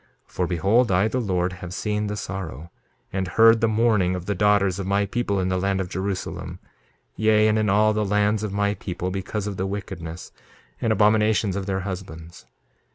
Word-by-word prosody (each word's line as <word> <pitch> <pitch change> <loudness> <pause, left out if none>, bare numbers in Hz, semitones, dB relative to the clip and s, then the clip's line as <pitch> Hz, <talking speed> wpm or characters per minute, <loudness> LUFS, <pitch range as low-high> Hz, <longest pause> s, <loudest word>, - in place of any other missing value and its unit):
2:31 - - -27
For 90 - -1
behold, 100 +7 +2
I, 95 +3 +3
the 125 +3 -1
Lord, 90 -4 -1
have 90 0 -8
seen 105 +1 -2
the 105 0 -4
sorrow, 85 -6 -6 0.4
and 95 -1 -1
heard 115 +3 +5
the 115 - +3
mourning 105 -5 +2
of 90 -1 -6
the 100 - -1
daughters 100 -1 +2
of 95 - -4
my 100 +1 +2
people 100 -1 -1
in 95 0 0
the 95 0 0
land 95 +1 0
of 95 -2 -3
Jerusalem, 95 +1 -4 0.6
yea, 110 0 +3
and 110 0 +2
in 105 -2 +1
all 105 +2 +4
the 105 0 0
lands 105 +1 +1
of 105 -2 -3
my 100 +1 0
people, 90 -2 -4
because 95 +2 -4
of 100 -2 -4
the 95 - -1
wickedness 90 -4 -6 0.5
and 115 - +1
abominations 105 -1 +3
of 100 0 -4
their 95 -1 -1
husbands. 90 -4 -8
100 Hz, 200 wpm, -24 LUFS, 95-105 Hz, 0.6 s, heard